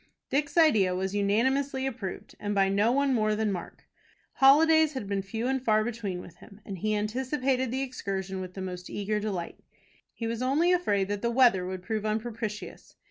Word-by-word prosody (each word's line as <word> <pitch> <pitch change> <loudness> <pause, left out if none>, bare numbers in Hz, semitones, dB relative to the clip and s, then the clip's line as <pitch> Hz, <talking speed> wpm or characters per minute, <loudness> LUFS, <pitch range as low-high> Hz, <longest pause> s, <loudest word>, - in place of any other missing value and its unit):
Dick's 290 +3 0
idea 215 - +4
was 190 +1 -2
unanimously 265 +7 +1
approved, 230 -8 -5
and 205 0 -2
by 195 -1 +3
no 205 +4 +2
one 280 +1 +2
more 215 -3 +2
than 220 0 0
by 190 -3 -1
Mark. - - -13 0.5
Holidays 315 +3 +5
had 260 -7 -5
been 200 -1 -1
few 220 +4 -4
and 265 0 0
far 215 -3 +3
between 215 -6 -4
with 175 - -13
him, 200 - -15
and 195 -3 -6
he 215 +2 0
anticipated 255 +4 -1
the 260 +3 -1
excursion 195 -7 -4
with 185 -1 -8
the 190 - -5
most 180 -1 -6
eager 210 +1 -2
delight. 195 -5 -4 0.5
He 230 - -6
was 230 +1 -3
only 290 +8 +2
afraid 205 - +1
that 205 -1 -2
the 235 - 0
weather 235 -7 +4
would 185 -1 -5
prove 215 +2 -2
unpropitious. 215 0 -4
215 Hz, 190 wpm, -28 LUFS, 195-260 Hz, 0.5 s, Holidays